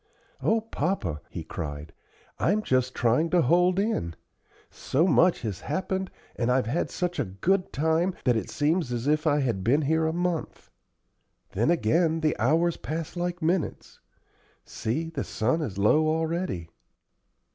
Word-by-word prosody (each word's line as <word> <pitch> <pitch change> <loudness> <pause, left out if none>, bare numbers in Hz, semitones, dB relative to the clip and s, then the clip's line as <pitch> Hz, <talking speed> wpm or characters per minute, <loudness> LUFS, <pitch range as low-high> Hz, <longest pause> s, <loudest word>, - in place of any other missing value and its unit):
"O 225 0 +2
papa!" 145 - -2
he - - -6
cried, 75 -1 -6 0.5
"I'm 210 +5 +2
just 130 -4 +1
trying 125 +8 +2
to 175 -1 +3
hold 180 +6 +3
in. 195 - -1 0.6
So 155 +6 0
much 175 +2 +4
has 100 -5 -3
happened, 190 - -2 0.3
and 120 0 0
I've 125 -1 +2
had 130 +10 -1
such 180 0 -3
a - - +2
good 175 - 0
time, 160 +4 +1
that 125 -3 +4
it 110 - -2
seems 150 -2 0
as 120 0 -2
if 150 +2 +1
I 145 -1 +3
had 115 -8 -1
been 140 +8 +3
here 160 +2 +2
a - - +1
month; 175 -1 -3 0.8
then 115 +9 +1
again 165 +2 +2
the 155 -1 +1
hours 160 +8 +2
pass 160 +1 -5
like 175 -1 -3
minutes. 170 +2 -2 0.7
See, 150 +9 -3
the 140 -5 -3
sun 130 +9 0
is 110 -11 -4
low 150 +10 +4
already." 160 - -2
155 Hz, 155 wpm, -27 LUFS, 120-175 Hz, 0.8 s, much